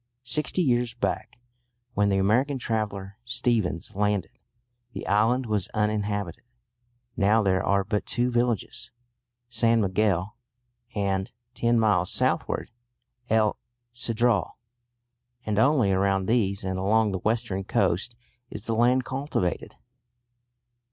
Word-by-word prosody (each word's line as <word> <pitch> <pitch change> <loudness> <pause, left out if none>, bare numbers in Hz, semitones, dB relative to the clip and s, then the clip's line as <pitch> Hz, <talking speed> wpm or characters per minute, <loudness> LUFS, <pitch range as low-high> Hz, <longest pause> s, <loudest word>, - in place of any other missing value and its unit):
Sixty 150 +7 0
years 120 -4 +1
back, 120 - -3 0.5
when 100 0 +2
the 95 - +2
American 125 +9 +2
traveller 105 -4 -3
Stephens 120 -10 -1
landed, 100 -4 0 0.6
the - - -6
island 115 +6 +2
was 105 -5 -1
uninhabited. 105 -4 -1 0.7
Now 110 0 +3
there 95 -1 +2
are 100 0 +2
but 105 +1 -2
two 120 +2 0
villages, 120 -1 -1 0.6
San 115 -1 +2
Miguel 100 0 +1 0.6
and, 95 -1 -1 0.2
ten 120 0 +2
miles 100 -5 +2
southward, - - 0 0.6
El 110 -1 +2 0.4
Cedral; 120 -5 0 0.9
and 105 -1 0
only 130 -5 +4
around 95 0 +1
these 100 -3 +1
and 95 0 -2
along 105 +2 +2
the 95 - -2
western 105 -2 -1
coast 95 +5 0 0.3
is 105 +1 -8
the 115 - -1
land 125 +3 +3
cultivated. 130 - -2
105 Hz, 115 wpm, -26 LUFS, 100-120 Hz, 0.9 s, only